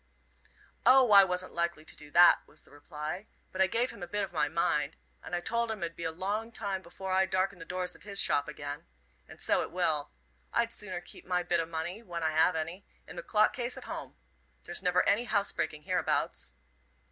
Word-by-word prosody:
"O, 255 Hz, -1 st, +6 dB
I 200 Hz, -1 st, +10 dB
wasn't 180 Hz, -1 st, -1 dB
likely 170 Hz, -2 st, -1 dB
to -, -, -5 dB
do 150 Hz, -1 st, -7 dB
that," 175 Hz, +4 st, +7 dB
was 150 Hz, -, -11 dB
the -, -, -18 dB
reply 150 Hz, +6 st, -6 dB, 0.2 s
"but 185 Hz, -, -2 dB
I 190 Hz, -, +6 dB
gave 235 Hz, +5 st, 0 dB
him 200 Hz, -, -13 dB
a 175 Hz, -, -5 dB
bit 205 Hz, +4 st, -1 dB
of 190 Hz, -, -5 dB
my 150 Hz, -2 st, +1 dB
mind, 160 Hz, -2 st, 0 dB, 0.2 s
and 175 Hz, -, -4 dB
I 175 Hz, -, -2 dB
told 235 Hz, +4 st, 0 dB
him 215 Hz, -5 st, -3 dB
it 170 Hz, -, -2 dB
'ud -, -, -30 dB
be 170 Hz, -, -6 dB
a 165 Hz, -, 0 dB
long 205 Hz, +7 st, -3 dB
time 195 Hz, -4 st, -3 dB
afore 190 Hz, +2 st, -5 dB
I 190 Hz, 0 st, +3 dB
darkened 185 Hz, 0 st, 0 dB
the -, -, -7 dB
doors 180 Hz, 0 st, -3 dB
of -, -, -15 dB
his 200 Hz, -1 st, -4 dB
shop 145 Hz, -, +2 dB
again. 145 Hz, -1 st, -6 dB, 0.4 s
And -, -, -13 dB
so -, -, +2 dB
it -, -, -4 dB
will. 160 Hz, -5 st, +1 dB, 0.4 s
I'd 235 Hz, 0 st, +1 dB
sooner 185 Hz, -6 st, -5 dB
keep -, -, -10 dB
my 180 Hz, -1 st, +1 dB
bit 175 Hz, 0 st, +1 dB
o' 165 Hz, -, -1 dB
money, 165 Hz, +5 st, -4 dB
when 175 Hz, -6 st, -5 dB
I 160 Hz, -, +2 dB
have 160 Hz, +3 st, +4 dB
any, 165 Hz, +5 st, -4 dB, 0.2 s
in -, -, -11 dB
the -, -, -4 dB
clock 215 Hz, -, +3 dB
case 245 Hz, 0 st, -3 dB
at -, -, -7 dB
home. -, -, -7 dB, 0.5 s
There's -, -, -4 dB
never 180 Hz, 0 st, +2 dB
any 215 Hz, +4 st, +3 dB
housebreaking 160 Hz, -8 st, 0 dB
hereabouts." 160 Hz, -, -1 dB
180 Hz, 225 wpm, -31 LUFS, 160-200 Hz, 0.5 s, I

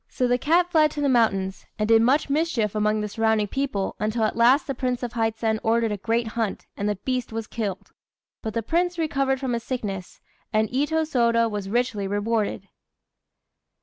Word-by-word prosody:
So 250 Hz, -, 0 dB
the 245 Hz, 0 st, +2 dB
cat 345 Hz, +5 st, +2 dB
fled 310 Hz, -2 st, +5 dB
to 295 Hz, -, -3 dB
the 285 Hz, -, +2 dB
mountains, 195 Hz, -6 st, +1 dB
and 215 Hz, -, 0 dB
did 225 Hz, 0 st, +6 dB
much 260 Hz, +6 st, +3 dB
mischief 280 Hz, -, 0 dB
among 215 Hz, 0 st, +1 dB
the 210 Hz, -, -2 dB
surrounding 220 Hz, 0 st, +1 dB
people, 265 Hz, -8 st, -2 dB
until 220 Hz, +2 st, 0 dB
at 215 Hz, -, 0 dB
last 245 Hz, +5 st, +4 dB
the 275 Hz, -, -2 dB
Prince 250 Hz, -1 st, -2 dB
of 240 Hz, -, -4 dB
Hizen 225 Hz, -1 st, 0 dB
ordered 230 Hz, -1 st, +1 dB
a 210 Hz, -, -2 dB
great 230 Hz, +3 st, -1 dB
hunt, 225 Hz, -2 st, -3 dB
and 205 Hz, +1 st, -1 dB
the 210 Hz, -, 0 dB
beast 250 Hz, +4 st, -3 dB
was 225 Hz, 0 st, -4 dB
killed. 210 Hz, -5 st, -5 dB, 0.5 s
But 220 Hz, -1 st, -5 dB
the 230 Hz, -, 0 dB
Prince 350 Hz, +7 st, 0 dB
recovered 275 Hz, -4 st, 0 dB
from 260 Hz, -2 st, -2 dB
his 235 Hz, -, -1 dB
sickness; 200 Hz, -8 st, -5 dB, 0.3 s
and 215 Hz, -1 st, +2 dB
Itô 295 Hz, +5 st, +1 dB
Sôda 235 Hz, -5 st, +2 dB
was 205 Hz, -2 st, -4 dB
richly 230 Hz, -3 st, 0 dB
rewarded. 205 Hz, -1 st, -1 dB
230 Hz, 190 wpm, -24 LUFS, 215-260 Hz, 0.5 s, did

